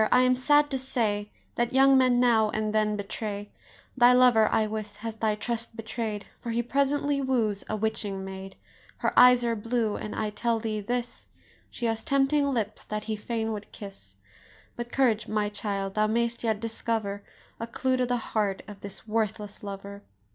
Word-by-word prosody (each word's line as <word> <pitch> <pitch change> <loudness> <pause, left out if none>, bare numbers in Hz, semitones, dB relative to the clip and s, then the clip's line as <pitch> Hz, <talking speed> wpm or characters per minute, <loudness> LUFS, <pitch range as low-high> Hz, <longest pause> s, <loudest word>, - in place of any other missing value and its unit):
I 250 - +6
am 255 0 +4
sad 290 +3 +3
to 265 - -1
say 215 -6 -1 0.2
That 240 0 -1
young 270 +1 +6
men 255 -2 +4
now 225 -3 +4
and 215 0 -2
then 215 -1 +2
betray: 205 0 -5 0.4
Thy 245 -1 +6
lover, 245 -3 +6
I 220 - +3
wis, 215 -1 -5
has 225 +1 -6
thy 215 -1 +1
trust 230 +2 -4
betray'd, 220 -2 -4 0.2
For 235 - -5
he 235 +1 0
presently 280 +2 +1
woos 230 -7 0
a 215 - 0
witching 205 -3 -2
maid: 190 0 -8 0.4
Her - - 0
eyes 250 -1 +7
are 230 -1 +1
blue, 225 0 -1
and, 210 - -6
I 215 -1 -2
tell 230 +2 0
thee 215 -1 -2
this, 240 +3 -4 0.4
She 240 - -5
has 225 -1 -1
tempting 280 +1 +2
lips 220 -5 -2
that 215 0 -3
he 220 0 -2
fain 225 +1 -3
would 205 -1 -7
kiss; 200 -2 -10 0.6
But 240 0 -6
courage, 235 -5 +2
my 210 -1 0
child, 200 -2 -3
thou 215 +1 +2
mayst 235 +2 -1
yet 220 -2 0
discover 225 -2 -2 0.4
A 230 - -4
clue 260 +2 0
to 250 -1 +1
the 245 0 +1
heart 210 -4 -1
of 205 -1 -10
this 200 +2 -10
worthless 210 -2 -2
lover." 200 0 -7
225 Hz, 185 wpm, -27 LUFS, 210-245 Hz, 0.6 s, eyes